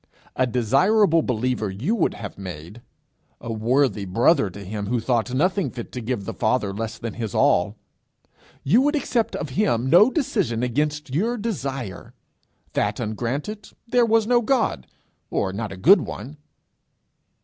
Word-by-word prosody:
A 130 - +2
desirable 155 - +3
believer 125 -4 -1
you 110 - -2
would 215 -8 +1
have 105 -3 -7
made! 90 +3 -9 0.6
A 115 0 -5
worthy 120 0 +1
brother 105 - +3
to 100 +2 -10
him 100 +1 -4
who 120 +2 0
thought 120 +1 0
nothing 185 +9 +1
fit 120 -2 -8
to 125 - -5
give 115 -3 -3
the - - -4
Father 110 -3 0
less 110 +1 -4
than 115 -2 -5
his 110 -4 -5
all! - - +3 0.9
You 220 - +4
would 290 +3 +2
accept 245 -5 0
of 145 - -4
him 130 - 0
no 195 +8 +7
decision 200 - -1
against 150 +2 -1
your 225 - 0
desire! 135 - -5 0.6
That 105 0 0
ungranted, 125 - -4
there 240 0 +3
was 225 -1 +3
no 240 +1 +3
God, 230 - 0 0.4
or 95 -1 -1
not 105 0 -4
a 95 - -7
good 180 - +6
one! 145 +1 -7
125 Hz, 155 wpm, -23 LUFS, -, 0.9 s, no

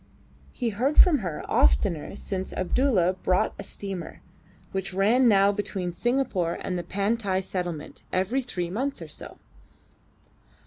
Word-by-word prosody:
He 240 -3 -2
heard 250 +8 0
from 325 -6 +7
her 175 -7 -4
oftener 65 - +2
since 190 -2 -4
Abdulla 185 -2 +2
bought 185 0 +2
a - - -4
steamer, 195 -4 -6 0.5
which 190 -1 -3
ran 230 +6 +4
now 200 -2 +5
between 195 -3 -3
Singapore 225 -7 0
and 185 - -3
the 175 - -1
Pantai 200 0 0
settlement 175 -5 -4
every 195 +9 +1
three 180 -9 -4
months 265 +8 -2
or - - -9
so. - - -11
195 Hz, 135 wpm, -26 LUFS, 180-235 Hz, 0.5 s, from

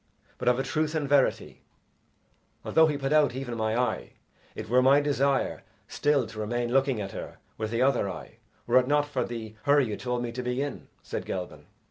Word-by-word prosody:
But - - -4
of 125 0 +4
a 135 - 0
truth 155 +3 -1
and 150 -3 -1
verity, 140 -1 +1 1.0
although 160 0 +5
he 150 -2 -1
put 135 +1 -1
out 150 -5 +4
even 130 -3 -4
my 110 0 0
eye, 125 -3 -2 0.4
it - - -6
were 125 +3 +4
my 135 +2 +6
desire 140 -1 0 0.3
still 145 -4 +1
to 110 0 -9
remain 120 +3 -2
looking 135 -3 +2
at 100 -2 -4
her - - -8 0.2
with 110 - -2
the 115 +2 +1
other 130 -7 +2
eye, 95 - -9 0.3
were 120 +2 +5
it 125 - -1
not 145 +1 +3
for 145 - -2
the 115 -2 -6
hurry 145 -1 +4
you 105 -3 -3
told 125 +2 -3
me 120 - -3
to 125 +2 -4
be 125 +1 -2
in," 145 0 -4 0.2
said - - -4
Gelban. 90 -1 -6
130 Hz, 205 wpm, -27 LUFS, 120-140 Hz, 1.0 s, my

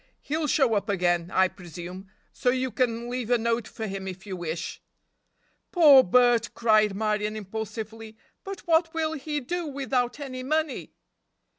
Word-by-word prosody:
He'll 305 +1 -2
show 265 -6 +3
up 200 -1 -1
again, 175 -3 +1
I 190 0 +4
presume, 180 +1 -9 0.2
so 250 - 0
you 255 0 0
can 235 +1 -1
leave 245 -1 -4
a 245 - +4
note 230 0 -1
for 220 - -6
him 195 -2 -5
if 190 +1 -7
you 195 -2 -5
wish." 165 0 -5 0.9
"Poor 295 -7 +8
Bert!" 240 +3 +3
cried 215 -3 +3
Marion 210 0 -1
impulsively, 220 +1 -6 0.3
"but 390 0 -7
what 330 -1 +2
will 320 -1 0
he 295 0 -3
do 340 +5 -3
without 265 -2 -1
any 260 -3 -6
money?" 310 +2 -2
230 Hz, 155 wpm, -26 LUFS, 200-270 Hz, 0.9 s, Poor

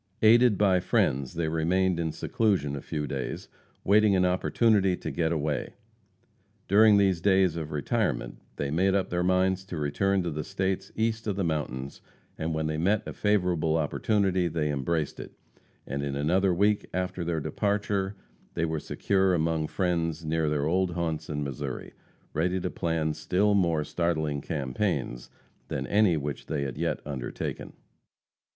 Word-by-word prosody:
Aided 115 -1 +6
by 95 -2 +4
friends, 70 -5 0
they 85 -1 -1
remained 85 +3 +1
in 80 -1 -1
seclusion 90 -8 0
a 70 - -5
few 75 -2 -3
days, 65 -2 -4 0.4
waiting 105 0 +4
an 90 -1 +3
opportunity 95 +1 +2
to - - -5
get 80 -1 0
away. 75 -3 -2 0.9
During 105 +1 +6
these 95 -4 +2
days 95 -3 +3
of 80 -2 -4
retirement 75 -3 -1 0.2
they 70 -1 -3
made 95 +5 +2
up 95 - 0
their 90 0 0
minds 95 +1 +2
to 90 -3 -6
return 95 +7 +1
to 85 - -2
the 75 0 -3
States 95 -1 -2
east 110 0 -1
of 100 - 0
the 100 - -1
mountains, 70 -5 -3 0.3
and 80 +1 -3
when 80 0 -1
they 80 0 -2
met 100 +5 +1
a - - -5
favorable 90 -6 +1
opportunity 95 +3 +1
they 75 -2 -1
embraced 75 +2 -2
it, - - -8 0.5
and 70 +2 -3
in 70 -1 -3
another 90 +7 +2
week 100 +4 +2
after 90 -1 -2
their 85 -1 -1
departure 100 +3 -1 0.4
they 85 - +1
were 80 -1 -2
secure 95 +3 +1
among 80 -1 0
friends 85 -3 -1
near 80 0 0
their 75 -1 0
old 90 +2 +1
haunts 80 -3 -2
in 75 -1 -2
Missouri, 70 -3 -5 0.4
ready 90 +4 0
to 90 - -3
plan 80 -3 -1
still 90 +7 +1
more 85 -6 +2
startling 80 -3 -1
campaigns 70 -2 -2 0.4
than - - -3
any 100 -5 +3
which 75 -1 -5
they 75 -3 -1
had 65 -3 -4
yet - - -2
undertaken. 70 -4 -5
85 Hz, 160 wpm, -27 LUFS, 75-95 Hz, 0.9 s, Aided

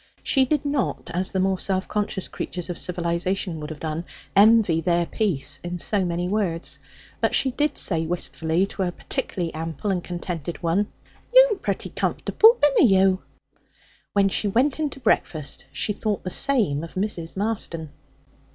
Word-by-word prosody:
She 270 -2 +3
did 295 +2 0
not, 280 -10 -1
as 185 +2 0
the 190 - -1
more 190 0 +1
self 190 -1 0
conscious 210 -3 -2
creatures 180 0 -5
of 175 - -5
civilization 175 0 -1
would 150 0 -6
have 155 -2 -7
done, 160 +1 -3 0.3
envy 205 -5 +5
their 170 +1 +2
peace 180 -9 -1
in 175 0 -4
so 200 +3 +1
many 175 0 -1
words. 185 -4 -2 0.4
But - - +1
she 265 - +3
did 295 +4 0
say 165 -3 +1
wistfully 170 0 0
to 195 - -6
a 180 -2 0
particularly 175 -1 -4
ample 165 +5 -3
and 180 -2 -1
contented 175 -2 -5
one, 185 +5 +1 0.4
'You'm - - +6
pretty - - -3
comfortable, 455 +3 +3
binna 285 -4 +5
you?' 190 0 +4 0.9
When 200 -1 +4
she 200 +2 0
went 255 +9 +1
in 305 -1 0
to 275 - -9
breakfast 155 - -1
she 180 +8 -1
thought 210 0 -2
the 185 - -4
same 205 - +2
of 165 - -9
Mrs. 185 -4 -2
Marston. 190 -7 -3
185 Hz, 165 wpm, -24 LUFS, 170-215 Hz, 0.9 s, You'm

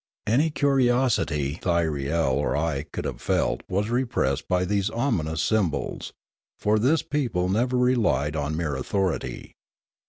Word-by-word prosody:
Any 135 +9 +3
curiosity 120 - +1
Thyriel 80 -4 0
or - - 0
I 75 -3 -1
could - - -4
have - - -5
felt - - 0
was 105 +4 -1
repressed 115 - 0
by 90 0 +1
these 100 +1 0
ominous 85 - -1
symbols; 95 -10 -1 0.5
for 105 +1 +2
this 140 +9 +2
people 120 -12 -1
never 125 +6 +1
relied 110 - +2
on 75 +1 -2
mere 80 -4 -1
authority. 95 +6 -2
95 Hz, 130 wpm, -25 LUFS, 75-120 Hz, 0.5 s, Any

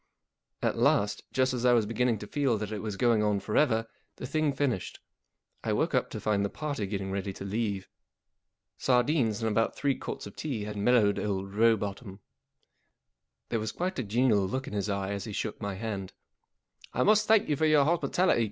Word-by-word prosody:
At - - 0
last, 100 0 +2
just 130 0 +1
as 125 -1 -2
I 125 -1 +5
was 115 -3 +3
beginning 115 +1 +1
to 105 - -8
feel 135 0 0
that 105 0 -5
it 105 -2 -4
was 105 -3 -4
going 115 -2 +3
on 105 -1 +1
for 100 +2 -4
ever, 115 -7 +3 0.3
the - - -7
thing 155 +2 +1
finished. 135 -8 -2 0.6
I - - 0
woke - - 0
up - - +1
to - - -6
find 100 -2 +1
the 100 - 0
party 145 -8 -3
getting 95 -1 -3
ready 100 0 -2
to 95 - -8
leave. 100 -1 -2 0.9
Sardines 125 -3 +2
and 110 - +2
about 115 +2 +1
three 140 -1 +1
quarts - - -6
of 100 - -10
tea 130 -9 -3
had 105 0 -5
mellowed 105 -1 +3
old 100 -1 -3
Rowbotham. 105 -2 +1 1.3
There 115 - 0
was 110 0 -3
quite 180 -4 -3
a - - 0
genial 110 -2 +2
look 130 +7 -3
in - - -8
his 105 0 -1
eye 100 0 -2
as 100 -1 -4
he 110 - -6
shook - - -4
my 100 -1 -3
hand. 100 -2 -5 0.4
" - - -25
I 125 - +3
must 215 +4 +4
thank 220 -1 +4
you 150 - +1
for 155 +3 +2
your 150 -2 +5
hospitality. 175 0 +2
110 Hz, 205 wpm, -29 LUFS, 100-130 Hz, 1.3 s, I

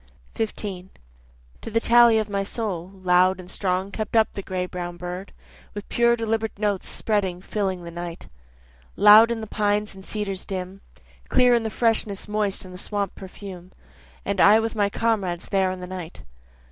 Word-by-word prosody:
15 200 -4 -4 0.7
To - - -6
the 225 +1 +1
tally 235 -1 +6
of 215 -1 0
my 200 -1 -1
soul, 195 -4 -3
Loud 185 +1 +4
and 180 0 -10
strong 190 0 -1
kept 215 +2 -4
up 220 -1 +4
the 200 - -5
gray 185 -1 -3
brown 175 -1 -6
bird, 180 +2 -6 0.4
With 205 - -6
pure 235 0 +3
deliberate 225 -2 -2
notes 205 -2 -1
spreading 195 -5 -1
filling 190 -2 -3
the 170 - -8
night. 170 0 -7 0.7
Loud 210 +3 +8
in 235 -1 -2
the - - -4
pines 210 0 0
and 190 0 -12
cedars 195 -2 -3
dim, 190 0 -6 0.5
Clear 250 -1 +5
in 235 - +3
the 225 - -2
freshness 220 -3 0
moist 210 -2 -1
and 185 - -11
the 180 - -7
swamp 200 -1 -2
perfume, 185 -1 -10 0.5
And - - 0
I 210 +2 +7
with 225 0 -2
my 205 -2 +2
comrades 200 -6 -1
there 190 -1 +2
in 185 0 -5
the - - -5
night. 180 -2 -8
200 Hz, 175 wpm, -24 LUFS, 185-220 Hz, 0.7 s, Loud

